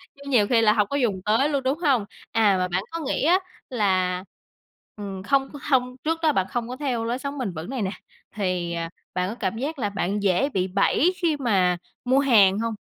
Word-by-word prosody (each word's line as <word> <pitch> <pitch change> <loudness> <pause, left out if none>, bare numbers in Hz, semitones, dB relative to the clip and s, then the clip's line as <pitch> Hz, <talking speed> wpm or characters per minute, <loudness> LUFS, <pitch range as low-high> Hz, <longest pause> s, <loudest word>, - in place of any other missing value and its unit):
chứ 280 - -15
nhiều 220 -6 +4
khi 230 0 +3
là 215 -1 +5
hổng 210 -2 +2
có 280 - -2
dùng 210 -9 0
tới 225 +8 +3
luôn, 280 -3 -1
đúng 270 +4 0
hông? 270 - +2 0.3
À, 210 -4 +3
mà 180 0 0
bạn 185 +2 -1
có 330 - -4
nghĩ 270 - -1
á 355 +5 +4 0.3
là, 185 -6 +1 0.7
ừm, 195 -2 -6
không 270 +3 +1 0.2
hông 250 -1 +2
trước 325 +1 0
đó 310 - +5
bạn 190 -8 0
không 240 -1 -2
có 250 - -4
theo 255 -6 -2
lối 240 +2 -2
sống 280 +1 -5
bền 215 -9 -3
vững 160 +5 -7
này 260 -3 -3
nè 190 -1 -1 0.4
thì, 180 -4 -1
ờ, 165 0 -3 0.3
bạn 180 +1 -1
có 225 - -5
cảm 225 -2 -3
giác 285 +3 -4
là 205 - 0
bạn 200 +1 -2
dễ 195 +9 +2
bị 190 -7 -1
bẫy 205 - +2
khi 325 -4 +1
mà 190 -9 +2 0.3
mua 260 +2 +4
hàng 210 -7 +5
hông? 230 0 -1
225 Hz, 230 wpm, -24 LUFS, 190-270 Hz, 0.7 s, là